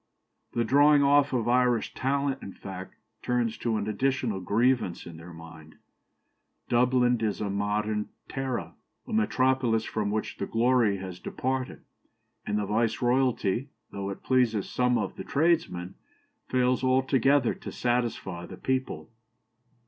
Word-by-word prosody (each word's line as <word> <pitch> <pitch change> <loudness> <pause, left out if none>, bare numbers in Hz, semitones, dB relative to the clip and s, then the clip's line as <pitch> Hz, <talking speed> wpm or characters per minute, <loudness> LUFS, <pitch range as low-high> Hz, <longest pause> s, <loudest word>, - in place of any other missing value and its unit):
The 120 - +1
drawing 145 +4 +5
off 145 0 +4
of 120 -3 0
Irish 125 -1 +2
talent, 135 0 -1
in 95 - -8
fact, 95 -1 -9 0.3
turns 120 -2 0
to 115 -2 0
an 105 0 -3
additional 120 -1 0
grievance 110 0 +1
in 85 -2 -9
their 85 +2 -11
minds. 80 -1 -12 0.9
Dublin 125 -1 +3
is 105 -2 -1
a 105 -2 -2
modern 105 +1 -1 0.2
Tara, 135 -2 -3 0.3
a 235 - -6
metropolis 130 - +2
from 105 -2 -2
which 105 +1 -3
the - - -3
glory 115 -3 +2
has 95 -1 -7
departed; 130 0 -3 0.6
and 105 - 0
the 105 - -1
viceroyalty, 120 +2 +1 0.2
though 100 -1 -4
it 100 - -7
pleases 120 -6 +2
some 125 -1 +1
of 100 -4 -3
the - - -5
tradesmen, 140 - 0 0.5
fails 125 0 +1
altogether 130 0 +3
to - - -8
satisfy 120 -8 -2
the - - -10
people. 130 -3 -2
120 Hz, 135 wpm, -27 LUFS, 105-130 Hz, 0.9 s, drawing